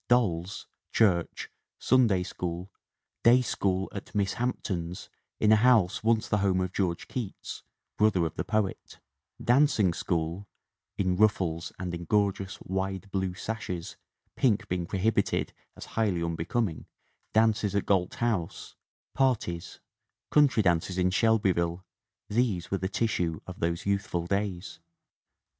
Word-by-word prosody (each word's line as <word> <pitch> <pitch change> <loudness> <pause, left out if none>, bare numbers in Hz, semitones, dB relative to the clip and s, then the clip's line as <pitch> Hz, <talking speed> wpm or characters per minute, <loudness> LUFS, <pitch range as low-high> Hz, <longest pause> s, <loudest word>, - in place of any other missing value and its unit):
Dolls, 95 -6 +1 0.3
church, 90 -7 +1 0.3
Sunday 115 -8 +3
School, 90 0 -5 0.5
day 125 +2 +6
school 95 -4 0
at 100 - -8
"Miss 100 -2 +1
Hampton's" 90 -8 -3 0.3
in 110 - +4
a - - +8
house 110 -6 +4
once 115 -1 +2
the 105 - +1
home 95 -2 +2
of 90 0 -2
George 90 -4 -1
Keats, 120 -7 -6 0.4
brother 105 -5 +3
of 80 - -3
the - - -3
poet; 105 -3 -2 0.4
dancing 120 - +3
school 85 +3 -2 0.5
("in 95 -2 +1
ruffles 85 -6 +1
and 90 -2 -4
in 85 0 -5
gorgeous, 100 0 0
wide, 95 +1 -3
blue 95 -2 -1
sashes, 90 -5 -5 0.4
pink 115 -6 +2
being 90 -1 -2
prohibited 100 +2 0 0.2
as - - -8
highly 100 -7 +1
un 85 0 -1
becoming"); 85 +1 -2 0.4
dances 110 -2 +2
at 100 - +1
Gait 95 -3 +1
House; 110 -8 -2 0.4
"parties," 115 -11 -1 0.5
coun 150 -1 +6
try 115 -5 0
dances 90 +1 +1
in 90 0 +2
Shelby 110 -1 +3
ville 85 +1 -2 0.4
these 105 -6 0
were 95 - 0
the 95 - -2
tissue 90 -7 0
of 90 0 -9
those 85 0 -1
youthful 100 -4 -1
days. 100 0 -2
95 Hz, 135 wpm, -28 LUFS, 90-110 Hz, 0.5 s, a